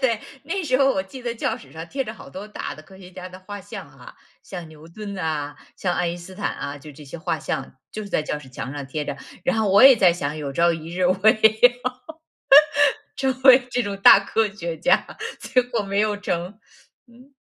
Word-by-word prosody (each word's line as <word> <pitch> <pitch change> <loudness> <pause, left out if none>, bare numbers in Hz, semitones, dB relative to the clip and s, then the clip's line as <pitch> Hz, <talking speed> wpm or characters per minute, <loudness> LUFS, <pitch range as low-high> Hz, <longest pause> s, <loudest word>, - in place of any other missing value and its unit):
对， 230 -4 +1 0.2
那 360 +6 -3
时 255 -5 +1
候 270 0 +4
我 190 - -1
记 250 +7 -11
得 240 -1 -3
教 225 0 -2
室 250 - -16
上 160 +1 -8
贴 270 +5 -3
着 215 - -6
好 - - -13
多 190 +3 -8
大 210 - -6
的 155 - -13
科 190 +4 -17
学 180 -1 -13
家 185 0 -9
的 185 0 -12
画 205 +2 -8
像 200 +1 -9
啊， - - -15 0.3
像 175 -4 -8
牛 155 0 -15
顿 200 +3 -8
啊， 150 -3 -3 0.2
像 180 -2 -1
爱 180 0 0
因 175 +1 -4
斯 180 +2 -11
坦 - - -2
啊， 140 - -6
就 145 +1 -12
这 150 +2 -13
些 140 +4 -9
画 160 0 -2
像 135 - -4 0.2
就 215 - -6
是 205 - -8
在 - - +1
教 150 - -3
室 135 -3 -14
墙 125 0 -6
上 145 -2 -6
贴 150 +2 -4
着。 - - -4 0.3
然 265 -4 +1
后 215 -3 +1
我 200 - +6
也 265 -1 +9
在 185 -5 +5
想， 150 -3 -4
有 145 -2 -5
朝 170 +5 +3
一 165 +1 -8
日 185 - -2
我 185 - +2
也 220 0 +6
要， 245 0 +5 1.4
成 265 -1 -1
为 260 -1 +7
这 245 - +1
种 200 -3 -4
大 195 - +8
科 220 +2 0
学 170 -5 -6
家， 160 - +1 0.2
结 255 -1 +1
果 245 -3 -2
没 200 0 -2
有 215 -1 +1
成。 185 0 -4 0.5
嗯。 255 +4 -19
190 Hz, 255 characters per minute, -23 LUFS, 160-225 Hz, 1.4 s, 也